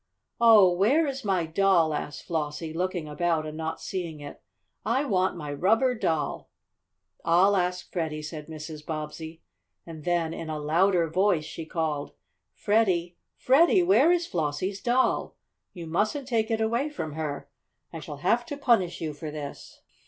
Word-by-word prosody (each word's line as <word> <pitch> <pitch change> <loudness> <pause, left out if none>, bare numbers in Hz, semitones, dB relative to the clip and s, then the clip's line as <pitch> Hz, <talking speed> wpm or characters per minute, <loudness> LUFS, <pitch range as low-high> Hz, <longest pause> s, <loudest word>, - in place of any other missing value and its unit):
"Oh, 215 -6 +7
where 235 - +3
is 275 -2 -4
my 190 -5 +1
doll?" 165 -1 +3
asked 145 0 -5
Flossie, 155 0 -3
looking 180 -1 -2
about 160 +1 0
and 155 0 -6
not 160 0 -4
seeing 170 -5 -5
it. 145 0 -10 0.4
"I 255 +6 +1
want 185 -6 +1
my 150 -3 -5
rubber 225 - +2
doll!" 160 - -2 0.7
"I'll 180 +4 +4
ask 180 -1 -1
Freddie," 155 -3 -3
said 150 -1 -7
Mrs. 155 -1 -8
Bobbsey, 160 +1 -6 0.4
and 160 -2 -9
then, 170 -1 0
in 165 - -6
a 155 - -3
louder 170 +4 +2
voice, 180 -1 +1
she 160 +1 -7
called: 155 - -2 0.4
"Freddie! 185 - +1 0.2
Freddie! 335 +8 +4
Where 345 -3 +5
is 350 -1 +2
Flossie's 175 - -2
doll? 250 +2 +1 0.4
You 175 -3 -8
mustn't 215 - -1
take 225 -4 0
it 225 -1 0
away 235 +6 0
from 160 - -5
her. 145 -3 -4 0.5
I 165 - -5
shall 150 -2 -8
have 240 +1 +3
to 290 - -5
punish 225 -11 +2
you 155 -2 -3
for 150 +1 -7
this!" 150 -2 -8
170 Hz, 160 wpm, -27 LUFS, 155-215 Hz, 0.7 s, Oh